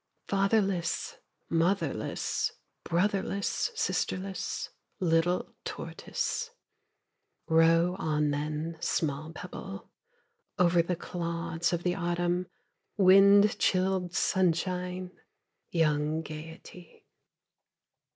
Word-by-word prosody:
Fatherless, 195 -4 +1 0.3
motherless, 170 +4 0 0.3
brotherless, 195 +2 0
sisterless 195 - -2 0.3
Little 175 0 +1
tortoise. 465 - -3 1.0
Row 165 +2 +4
on 150 -1 +1
then, 155 +3 -3
small 155 -1 -1
pebble, 165 - -8 0.7
Over 175 -1 +4
the 175 +2 -1
clods 170 -1 -2
of 175 -1 -1
the 180 - +1
autumn, 175 0 -1 0.5
wind 200 +2 +6
chilled 185 -1 +1
sunshine, 180 0 0 0.6
Young 155 -1 +1
gayety. 160 +3 -11
175 Hz, 75 wpm, -29 LUFS, 165-185 Hz, 1.0 s, wind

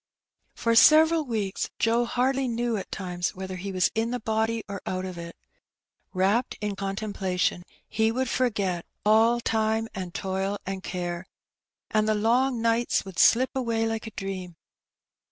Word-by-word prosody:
For 230 - +1
several 315 +6 +6
weeks 210 -6 -2
Joe 235 +1 +2
hardly 260 +2 0
knew 235 0 -1
at 195 - -5
times 180 -2 -3
whether 190 0 -6
he 195 +2 -5
was 185 -2 +2
in 225 +1 0
the 250 +1 -2
body 220 0 -1
or 200 -2 -6
out 185 0 -2
of 185 -1 -6
it. 170 0 -8 0.8
Wrapped 200 +6 +1
in 210 -2 -3
contem 195 +2 -4
plation, 180 -2 0 0.3
he 220 0 +1
would 260 +3 -1
forget 205 -9 -1 0.2
"all 225 +3 +5
time 220 -1 0
and 185 -2 -5
toil 190 +2 -2
and 190 0 -4
care,'' 175 0 -4 0.6
and 215 0 +2
the 215 - +3
long 235 +3 +2
nights 230 -1 +1
would 190 -3 -7
slip 255 +3 +5
away 230 -3 0
like 225 0 -3
a - - -7
dream. 185 -3 -5
215 Hz, 160 wpm, -26 LUFS, 190-230 Hz, 0.8 s, several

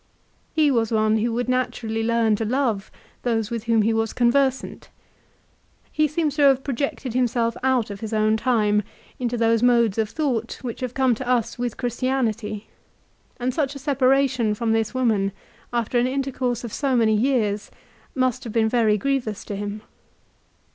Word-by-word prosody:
He 305 -2 +4
was 230 -3 +1
one 215 0 +2
who 230 +2 0
would 245 +1 -1
naturally 245 -3 -1
learn 230 -1 +2
to 225 - -2
love 225 -4 -1 0.3
those 225 -3 -1
with 230 -1 -4
whom 225 -2 +3
he 225 +2 +2
was 225 0 -1
conversant. 265 +2 +1 1.0
He 305 0 +2
seems 300 -1 -1
to - - +2
have 270 -2 +5
projected 270 -2 -3
himself 240 -2 +1
out 255 -5 +1
of 200 - -7
his 220 0 -6
own 215 0 +2
time 215 -3 +2 0.4
into 245 -1 -1
those 230 -1 +2
modes 235 -4 +3
of 220 -1 0
thought 245 -7 -2
which 235 -3 -5
have 255 -2 -4
come 260 -2 +3
to 245 +2 -5
us 240 -2 0
with 245 -2 -3
Christianity, 235 -4 -2 0.7
and 250 +1 -1
such 285 -1 -1
a - - -5
separation 265 -4 +2
from 230 +1 -1
this 225 +2 0
woman 215 -6 +1 0.4
after 240 0 0
an 245 - +2
intercourse 260 -3 -2
of 235 - -6
so 275 -3 0
many 220 -2 +3
years 215 -3 0 0.5
must 255 -3 0
have 230 - -6
been 225 -1 +3
very 220 -3 +3
grievous 240 -2 -2
to 205 - -5
him. 205 +1 -5
235 Hz, 170 wpm, -23 LUFS, 220-255 Hz, 1.0 s, have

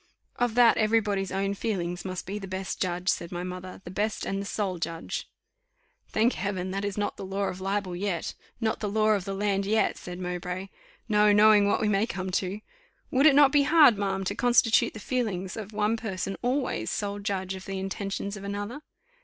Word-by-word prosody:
"Of 240 -2 0
that 245 -1 +6
every 220 +1 +4
body's 200 -3 -2
own 195 +1 0
feelings 180 -5 -3
must 185 -1 -4
be 200 +3 -4
the 195 - -7
best 190 0 -4
judge," 180 -1 -2
said 170 -2 0
my 175 0 -4
mother, 185 +1 -7
"the 175 - -8
best 210 +3 -1
and 195 0 -2
the 200 - -5
sole 195 -5 -2
judge." 165 0 -4 0.8
"Thank 225 +3 +2
Heaven! 190 -2 -3
that 195 +1 -3
is 200 -1 -3
not 205 - -2
the - - -6
law 195 +1 -2
of 185 - -7
libel 195 -1 -1
yet, 180 -2 -2 0.3
not 225 -2 0
the 210 - -2
law 215 +1 +2
of 205 -4 +2
the 195 - -3
land 200 0 0
yet," 220 +1 +2
said 180 0 -7
Mowbray; 180 +1 -4 0.4
"no 210 -1 +4
knowing 210 0 +6
what - - +2
we 215 - +2
may 210 +2 +2
come 185 -2 -4
to. 195 +2 -2 0.5
Would 275 +3 +5
it 285 - +6
not 285 -1 +7
be 290 -1 +5
hard, 295 -7 +6
ma'am, 195 -1 -1
to 190 - -1
constitute 240 0 +3
the - - -6
feelings 205 -6 -2
of 215 -2 -6
one 215 +1 +1
person 195 -3 -3
always 250 - -1
sole 205 -1 -2
judge 195 -2 -2
of 190 0 -8
the 195 0 -4
intentions 195 +1 -3
of 200 - -9
another? 205 +7 -4
200 Hz, 210 wpm, -27 LUFS, 185-215 Hz, 0.8 s, not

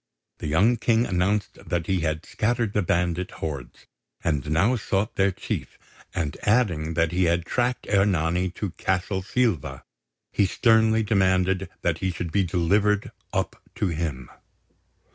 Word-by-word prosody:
The - - -4
young 100 +11 +3
King 115 +1 +2
announced 100 +1 0
that 85 -2 -2
he 95 -1 +1
had 80 -1 -2
scattered 115 -1 0
the 105 - +2
bandit 90 -1 0
hordes, 70 -6 -6 0.4
and 75 -2 -1
now 90 +11 +3
sought 105 -2 -1
their 95 0 +3
chief; - - -5 0.3
and 75 -4 -2
adding 90 -9 +1
that 85 0 +2
he 90 +1 +2
had 85 0 +1
tracked 125 +6 -1
Ernani 90 -3 +2
to 100 -4 -3
Castle 95 +2 -1
Silva, 110 - -1 0.5
he 100 - +3
sternly 110 +2 +3
demanded 95 -3 +2
that 85 -2 +1
he 95 - 0
should 85 -2 -4
be 100 +2 +2
delivered 100 +4 +1 0.2
up - - -2
to 100 - 0
him. 75 -6 -4
95 Hz, 145 wpm, -25 LUFS, 85-105 Hz, 0.5 s, young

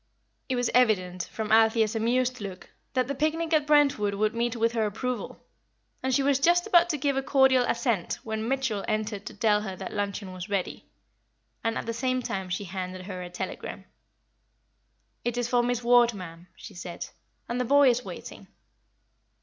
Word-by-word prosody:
It 260 - +1
was 245 -1 0
evident, 185 -7 +2
from 220 -1 -4
Althea's 220 0 +4
amused 250 +2 0
look, 190 -2 -8 0.2
that 255 -2 +1
the 280 - -2
picnic 315 +3 -1
at 300 -2 +3
Brentwood 280 -9 +3
would 215 +1 +1
meet 235 +1 -1
with 230 0 +1
her 225 -2 0
approval, 240 +2 -4 0.6
and 260 - -1
she 270 +2 +2
was 275 -1 +3
just 345 +4 +4
about 350 -5 +5
to 305 - 0
give 280 0 0
a - - +2
cordial 265 -1 +4
assent 235 -7 0
when 220 0 -3
Mitchell 260 -6 -1
entered 215 -2 -2
to - - -8
tell 210 -3 +2
her 190 -3 -5
that 190 0 -7
luncheon 200 -2 -3
was 185 0 -7
ready; 195 -3 -3 0.8
and 225 0 0
at - - -4
the 230 - -3
same 255 +1 -1
time 190 -4 -3
she 185 +3 -2
handed 185 -1 -6
her 185 -2 -6
a 180 - -6
telegram. 175 - -6 1.4
"It 240 0 -2
is 245 -1 0
for 245 -1 +3
Miss 245 0 -1
Ward, 240 -1 +5
ma'am," 175 -2 -9
she - - -11
said; 175 0 -6 0.4
"and 245 +1 -1
the - - +2
boy 280 +3 +5
is 245 +1 -2
waiting." - - -9
230 Hz, 185 wpm, -27 LUFS, 205-255 Hz, 1.4 s, about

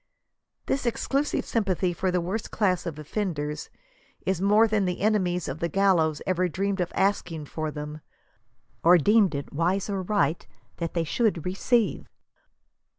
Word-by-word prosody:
This 270 -2 -1
exclusive 275 +5 0
sympathy 190 -5 0
for 185 +2 -1
the 180 0 +1
worst 195 +6 -3
class 185 -4 0
of 160 -3 -5
offenders 150 -2 -3 0.6
is 190 -2 0
more 210 +3 +5
than 210 -3 +1
the 180 -1 -2
ene 210 0 +2
mies 180 -1 -2
of 135 +4 -5
the 170 - -1
gallows 165 -5 +2
ever 185 -1 +1
dreamed 195 +3 -1
of 175 - -2
asking 180 -5 0
for 155 +1 -4
them, 150 0 -7 0.8
or 175 +2 +7
deemed 200 0 +4
it 140 - -5
wi&e 175 +6 +1
or 195 -1 -1
right 185 -4 0 0.3
that 170 0 -4
they 170 - +1
should 195 0 0
receive. 210 +5 0
185 Hz, 155 wpm, -26 LUFS, 165-200 Hz, 0.8 s, or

